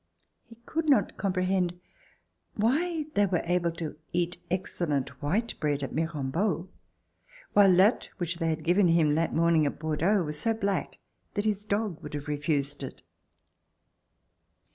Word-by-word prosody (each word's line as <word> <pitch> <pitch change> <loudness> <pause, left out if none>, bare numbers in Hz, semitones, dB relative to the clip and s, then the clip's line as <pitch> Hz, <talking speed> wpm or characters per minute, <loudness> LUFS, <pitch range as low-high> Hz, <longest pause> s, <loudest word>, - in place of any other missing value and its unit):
He 230 - -14
could 320 -1 -1
not 275 - +3
comprehend 185 -2 0 0.8
why 305 +9 +1
they 205 0 +3
were 180 -2 0
able 175 0 +1
to 160 -2 -6
eat 175 0 0
excellent 165 -6 -2
white 205 +11 0
bread 145 -2 0
at 135 - -4
MIrambeau, 165 +4 -1 0.8
while 195 -3 +6
that 195 +6 +4
which 170 -2 -3
they 165 -1 +1
had 160 0 -2
given 180 +3 +4
him 165 -3 +4
that 165 +2 0
morning 165 -2 +4
at - - -4
Bordeaux 165 +6 +1
was 150 -1 -4
so 225 +4 +1
black 200 -2 -2 0.4
that 205 0 0
his 205 -1 0
dog 205 -5 -1
would 150 - -7
have 145 0 -5
refused 145 -1 -1
it. 135 - -7
175 Hz, 145 wpm, -28 LUFS, 155-200 Hz, 0.8 s, while